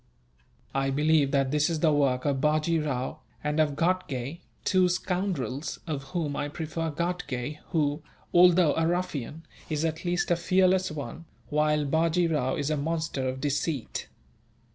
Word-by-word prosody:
"I 135 0 +1
believe 150 +1 +3
that 135 -2 +1
this 150 +1 +2
is 160 -2 -2
the 155 -3 +4
work 135 -3 +2
of 140 -2 +1
Bajee 155 +2 +2
Rao, 135 +1 -3 0.2
and 150 +1 0
of 150 -2 +2
Ghatgay 165 -4 -1 0.3
two 185 -1 +4
scoundrels, 175 - -2
of 145 -4 -4
whom 145 0 -2
I 145 - -1
prefer 160 +2 -3
Ghatgay 150 -4 -3
who, 150 -3 0 0.3
although 175 -3 +6
a 165 0 +1
ruffian, 165 -4 -2 0.3
is 155 0 0
at 160 0 -2
least 175 0 0
a - - +5
fearless 185 +2 +3
one, 155 +2 -6 0.3
while 150 0 +2
Bajee 165 +3 +2
Rao 130 -4 +1
is 145 +1 -1
a 155 - +1
monster 155 -3 -1
of 130 +1 -5
deceit. 145 -2 -2
155 Hz, 155 wpm, -28 LUFS, 140-170 Hz, 0.3 s, although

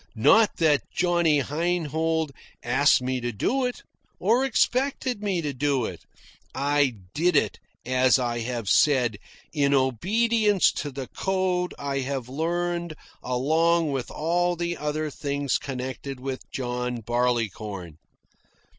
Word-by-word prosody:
Not 210 - +4
that 155 -3 +3
Johnny 170 -4 +2
Heinhold 160 0 -1 0.3
asked 125 +2 +3
me 130 0 -1
to 120 0 -2
do 255 - 0
it, 250 - -4 0.4
or 230 +7 +3
expected 260 -2 0
me 190 -5 -1
to 145 -2 -2
do 135 -2 0
it. - - -7 0.5
I 140 -1 +2 0.2
did 175 +2 +2
it, - - +1 0.3
as 130 +1 +4
I 120 -2 -1
have 115 -2 -4
said, 120 -1 +3 0.3
in 140 -2 +2
obedience 205 - +2
to 145 - -3
the 135 -1 -6
code 185 +2 -1
I 140 -1 -2
had 135 -2 -3
learned 170 +3 -2 0.3
along 160 +6 +2
with 135 -3 -3
all 175 +3 0
the 170 0 -2
other 150 0 -3
things 140 -1 -1
connected 130 0 -5
with 130 0 -6
John 125 -1 -3
Barleycorn. 110 -7 -2
145 Hz, 130 wpm, -25 LUFS, 125-175 Hz, 0.5 s, Not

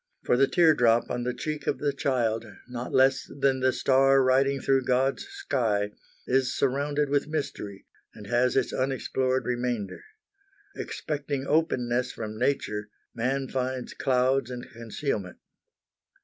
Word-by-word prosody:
For - - +3
the 135 +2 +4
teardrop 125 -9 +4
on 120 - -2
the 125 - 0
cheek 150 -1 -4
of - - +1
the 145 -1 -1
child, 120 -5 0 0.2
not 125 0 -6
less 135 +1 +3
than 135 -1 +2
the 130 0 +3
star 135 +1 +4
riding 135 +2 +3
through 135 -1 +2
God's 130 - +1
sky, 115 - -1 0.3
is 130 0 +1
surrounded 145 +2 +1
with 145 +1 +1
mystery, 120 -10 -4 0.3
and 105 - -10
has 120 +4 +2
its 135 -2 +1
unexplored 130 0 0
remainder. 120 -4 -2 0.7
Expecting 145 -2 -4
openness 125 -5 +1
from 110 -1 -6
nature, 105 -5 -1 0.2
man 135 +3 -1
finds 130 -1 -3
clouds 130 -1 +1
and 125 -1 -6
concealment. 115 -4 -4
130 Hz, 135 wpm, -27 LUFS, 120-140 Hz, 0.7 s, the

